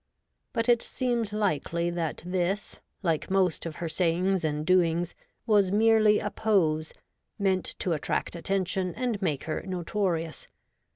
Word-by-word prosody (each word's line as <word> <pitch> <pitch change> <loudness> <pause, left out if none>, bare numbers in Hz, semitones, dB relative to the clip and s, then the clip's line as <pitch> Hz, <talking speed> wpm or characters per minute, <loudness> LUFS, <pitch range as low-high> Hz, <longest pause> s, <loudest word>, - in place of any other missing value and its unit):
But 230 0 -1
it 240 -1 +4
seems 240 -4 -1
hkely 175 -4 -1
that 165 -3 -3
this, 185 +3 -1 0.2
like 165 -4 0
most 185 -4 +1
of 160 - -6
her 170 - -4
sayings 180 +3 +1
and 150 -1 -1
doings, 175 -1 +2 0.3
was 205 -5 +3
merely 215 0 +5
a 210 - -2
pose, 160 -8 +1 0.5
meant 190 -2 +1
to 180 - -1
attract 155 +2 -2
attention 185 +1 -1
and 245 -5 -2
make 155 -8 -1
her 155 - -3
notorious. 175 -3 -2
185 Hz, 135 wpm, -28 LUFS, 165-205 Hz, 0.5 s, merely